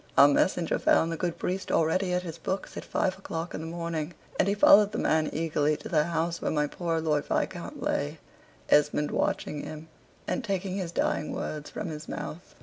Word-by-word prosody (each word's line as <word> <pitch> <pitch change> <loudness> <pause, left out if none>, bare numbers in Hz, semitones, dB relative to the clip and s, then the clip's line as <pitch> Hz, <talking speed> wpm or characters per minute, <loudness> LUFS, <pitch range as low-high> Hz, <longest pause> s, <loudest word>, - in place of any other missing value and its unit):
Our 140 - +10
messenger 165 +3 +2
found 165 - +3
the - - -1
good 170 0 -2
priest 190 +1 -2
already 180 +4 +2
at 180 0 0
his 165 -3 -7
books 190 0 -3
at - - -5
five 190 0 -1
o'clock 165 -3 -5
in - - -4
the 160 - -5
morning, 170 -1 -3 0.2
and - - +4
he 200 - +2
followed 205 0 +7
the - - -1
man 155 -1 +2
eagerly 150 -2 +1
to - - -8
the 155 -3 +3
house 170 0 -1
where - - 0
my 150 -1 +1
poor 165 +2 -2
Lord 150 -2 +1
Viscount - - -2
lay 70 - -1 0.5
Esmond 150 0 +3
watching 150 -1 -1
him, 155 +1 -8 0.4
and 265 - -1
taking 195 -3 -2
his 180 -4 -3
dying 155 - 0
words 150 -1 -4
from 190 - -5
his 155 0 -7
mouth. 170 +4 -6
165 Hz, 200 wpm, -28 LUFS, 155-180 Hz, 0.5 s, Our